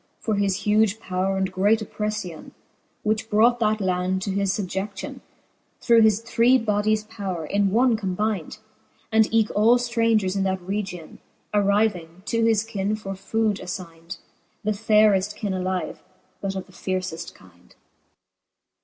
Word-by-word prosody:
For 220 - -2
his 200 -1 0
huge 215 0 +3
powre 190 0 -1
and 190 -1 -1
great 205 +4 +3
oppreffion, 210 -5 -5 0.5
Whichbrought 220 +2 +2
that 215 -1 +1
land 185 0 0
to 195 - -2
that 200 +1 0
fubje6iion, 195 0 -3 0.6
Through 235 -2 +5
his 220 -1 +4
three 230 +2 +3
bodies 215 -1 +1
powre, 195 -7 -5
in 200 +2 +1
one 235 +4 +3
combynd 200 -2 -2
j - - -11 0.5
And 220 0 +3
eke 225 -1 +2
all 225 +4 +5
ftrangers 230 -5 +1
in 195 - 0
that 190 -1 0
region 190 -2 -5 0.3
Arryving, 200 -4 +1
to 230 +1 0
his 225 -2 +3
kyne 210 -2 -2
for 195 -2 -6
food 210 +2 -1
affyne; 175 -1 -7 0.5
The 215 - +1
fayreft 210 -1 +3
kyne 205 -2 -3
alive, 185 0 -3 0.4
but 195 -1 -3
of 190 - -4
the - - -20
lierceft 180 -2 -4
kynd. 90 -1 -21
205 Hz, 145 wpm, -24 LUFS, 185-220 Hz, 0.6 s, Through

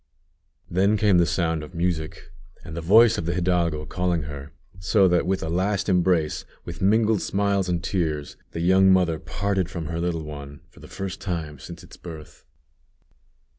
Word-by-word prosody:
_" - - -47 0.6
Then 100 +4 +2
came 100 -4 +4
the 85 - +3
sound 80 -3 0
of 75 +3 -10
music, 85 -2 -3 0.3
and 80 - -8
the 85 - -4
voice 110 +7 +5
of 85 - -4
the 85 - -1
hidalgo 85 -4 0
calling 90 -2 -1
her; 70 0 -8 0.3
so 95 +2 +3 0.2
with 95 +2 -1
a - - -3
last 95 +4 0
embrace, 90 -4 +1 0.2
with 85 -1 -8
mingled 110 +1 +3
smiles 100 -1 0
and 85 -1 -1
tears, 80 -6 -2
the 85 - -5
young 95 +2 +5
mother 90 -4 +2
parted 95 +3 -2
from 85 -1 -5
her 85 0 -3
little 85 -2 -2
one, 70 -1 -9
for - - -18
the - - -12
first 95 -1 -6
time 80 -7 -4
since 85 +4 -10
its 90 - -14
birth. 80 -3 -11
85 Hz, 175 wpm, -24 LUFS, 80-95 Hz, 0.6 s, voice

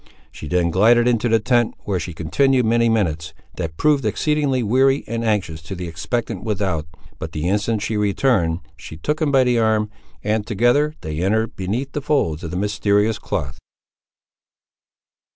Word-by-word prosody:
She 75 - -9
then 85 0 +1
glided 115 +6 +4
into 120 -1 +2
the 115 0 +4
tent, 120 0 +1
where 95 -3 -1
she 90 - -5
continued 125 - +2
many 115 +1 +3
minutes, 80 -7 -1 0.2
that 80 -1 -4
proved 150 -3 +2
exceedingly 135 +3 0
weary 135 +5 +3
and 115 +1 -3
anxious 95 -8 -1
to 80 +5 -7
the 90 -1 -5
expectant 85 +9 -3
without, 95 -7 -2 0.3
but - - -6
the 75 +2 -2
instant 105 +2 0
she 110 0 -2
returned, 100 -5 +1 0.2
she 80 +1 -10
took 150 - -2
him 150 -2 +2
by 135 -2 +5
the 125 -2 +2
arm, 110 -1 +1 0.3
and 105 0 -1
together 120 +8 +2
they 80 0 -5
entered 110 +4 0
beneath 115 +9 -3
the 145 - -3
folds 95 - 0
of 80 - -4
the 90 - -4
mysterious 105 +1 +1
cloth. 70 +2 -4
105 Hz, 170 wpm, -21 LUFS, 90-120 Hz, 0.3 s, by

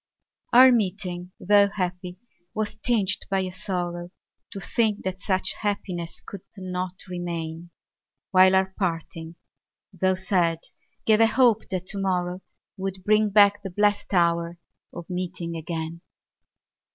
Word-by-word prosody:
Our 255 +2 +8
meeting, 185 -5 -1
tho' 205 +1 +5
happy, 180 -2 -4 0.4
was 215 -1 -1
tinged 215 -3 +1
by 195 -1 +1
a 185 -1 -3
sorrow 175 -2 -4 0.4
To 195 - -7
think 215 0 0
that 190 +1 -4
such 190 -2 0
happiness 185 -5 -3
could 200 - -8 0.2
not 185 -1 -4
remain; 170 -2 -5 0.6
While 185 0 +6
our 190 0 +1
parting, 165 -2 -3 0.6
tho' 185 +1 +1
sad, 180 -3 +1 0.5
gave 215 -1 +4
a 225 - +7
hope 235 -2 +3
that 185 -2 -3
to 200 +1 -4
morrow 180 -1 -1 0.4
Would 190 -1 -5
bring 215 +1 +3
back 205 0 +5
the 195 - -6
blest 205 +2 +1
hour 170 -2 +1 0.3
of 170 - -9
meeting 180 -2 -4
again. 165 0 -5
185 Hz, 130 wpm, -25 LUFS, 175-200 Hz, 0.6 s, Our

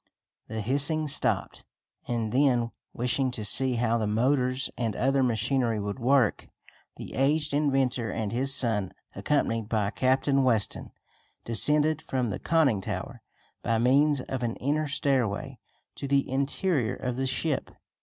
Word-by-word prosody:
The 110 0 -4
hissing 145 +7 +3
stopped, 145 - -1 0.4
and 115 -3 -2
then, 125 -3 +2 0.2
wishing 125 +2 0
to 110 -4 -5
see 130 +5 +1
how 115 0 +1
the 110 - -1
motors 130 +4 +1
and 115 -4 -2
other 135 +1 +1
machinery 120 -1 0
would 105 +4 -4
work, 125 -2 +2 0.5
the - - -9
aged 145 +2 +1
inventor 135 -5 +1
and 110 -2 -3
his 130 +4 0
son, 110 -8 +1 0.2
accompanied 115 -2 -1
by 105 -3 0
Captain 135 +2 +1
Weston, 115 -6 0 0.6
descended 150 +6 +3
from 125 -4 -2
the - - -4
conning 145 -11 +2
tower, - - -6 0.4
by 115 -1 0
means 140 +4 +3
of 130 0 -5
an 120 -1 -2
inner 150 +3 -1
stairway, 135 -3 -1 0.4
to 140 - -5
the 140 0 +1
interior 140 0 0
of 125 -1 -4
the 130 +1 -2
ship. 135 +3 -1
130 Hz, 145 wpm, -27 LUFS, 115-140 Hz, 0.6 s, hissing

